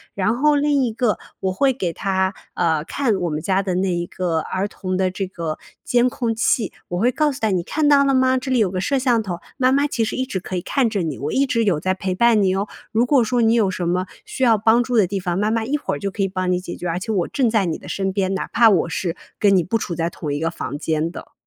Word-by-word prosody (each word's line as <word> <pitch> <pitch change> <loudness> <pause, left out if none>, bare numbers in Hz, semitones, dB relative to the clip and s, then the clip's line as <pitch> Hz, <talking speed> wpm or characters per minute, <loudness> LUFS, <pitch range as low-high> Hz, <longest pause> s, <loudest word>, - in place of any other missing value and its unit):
然 200 +4 +1
后 300 +2 +3
另 285 -1 +2
一 235 - 0
个 230 -2 +1 0.2
我 190 - 0
会 265 +6 +2
给 185 -9 -2
他， 190 0 0 0.2
呃， 160 -3 +1
看 255 -7 0
我 180 -3 -1
们 150 0 -3
家 195 +2 +1
的 190 -2 -2
那 185 0 +1
一 175 0 -1
个 175 -2 -2
儿 190 +5 -2
童 185 -3 -4
的 190 -1 +1
这 195 +1 -3
个 165 -4 -4 0.3
监 245 0 +3
控 230 -2 -2
器， 225 -1 +1 0.2
我 175 0 -2
会 245 +4 +3
告 300 +2 +1
诉 265 - -7
他 220 - +2
你 180 -3 0
看 300 - 0
到 280 -1 +6
了 275 - +2
吗？ 260 0 +3
这 260 +1 -4
里 255 - +3
有 210 -4 +3
个 185 - -2
摄 275 +5 +1
像 245 -3 +2
头， 175 -4 -4 0.2
妈 255 -1 +3
妈 280 +2 +3
其 235 -5 -1
实 - - -3
一 260 - 0
直 200 -7 -3
可 185 +1 -6
以 175 - -1
看 265 +3 +1
着 205 -3 -1
你， 155 -4 -3
我 145 +2 -3
一 275 - +3
直 230 -2 +1
有 185 -8 +1
在 185 +3 0
陪 190 -1 -2
伴 230 0 +4
你 190 0 +2
哦， 200 +2 -1 0.2
如 230 +3 +2
果 265 -3 +4
说 240 +2 +1
你 225 0 +4
有 215 -4 +3
什 180 -2 -3
么 180 +1 0 0.2
需 265 - -4
要 230 -3 +5
帮 225 +3 +4
助 245 +1 -2
的 200 - +4
地 195 +2 -2
方， 180 -1 -2
妈 210 +1 +1
妈 225 0 0
一 275 +5 -1
会 295 - -3
儿 - - -6
就 200 -1 -3
可 200 - -4
以 - - +2
帮 185 -1 -2
你 180 - +1
解 180 -1 -7
决， 175 - -5
而 170 +2 -1
且 220 +3 -4
我 185 -5 0
正 255 -5 +1
在 215 -3 +2
你 165 -2 -2
的 - - -12
身 195 -1 -2
边， 190 -1 0
哪 - - -3
怕 230 -1 +5
我 180 -5 +2
是 170 0 -2 0.2
跟 200 -2 +4
你 180 - +3
不 210 +8 0
处 175 - -4
在 165 0 -1
同 150 -3 -5
一 145 - -2
个 165 +1 -1
房 145 -3 -5
间 160 +2 -1
的。 - - -10
195 Hz, 315 characters per minute, -21 LUFS, 180-240 Hz, 0.3 s, 到